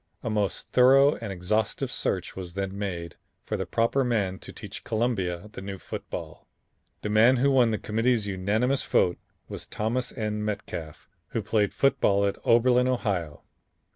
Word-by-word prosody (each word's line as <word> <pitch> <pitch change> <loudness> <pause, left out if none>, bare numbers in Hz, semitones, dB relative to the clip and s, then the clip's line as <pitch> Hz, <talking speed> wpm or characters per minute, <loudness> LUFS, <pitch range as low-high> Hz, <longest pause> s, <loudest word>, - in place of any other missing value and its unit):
A 115 - -2
most 105 -2 -1
thorough 135 +3 +6
and 115 -3 -6
exhaustive 100 +4 -1
search - - -2
was 90 -2 -7
then 95 0 -3
made 90 -4 -4 0.3
for - - -3
the - - -3
proper 115 +4 +1
man 100 -6 0
to - - -9
teach - - -9
Columbia 105 -5 -1
the - - -8
new 100 0 -6
football. - - -7 0.6
The 105 - -2
man 115 +4 +6
who 140 +3 +3
won 125 -3 +5
the 110 - 0
Committee's 115 +1 +1
unanimous 105 +7 0
vote 90 -1 +2 0.3
was - - -7
Thomas 120 +4 -2
N. 105 -1 -3
Metcalf, 85 -7 -5 0.3
who - - -1
played 105 -3 +1
football 100 -7 +2
at 100 - -1
Oberlin, 125 +2 +4
Ohio. 95 - -2
105 Hz, 160 wpm, -27 LUFS, 95-120 Hz, 0.6 s, thorough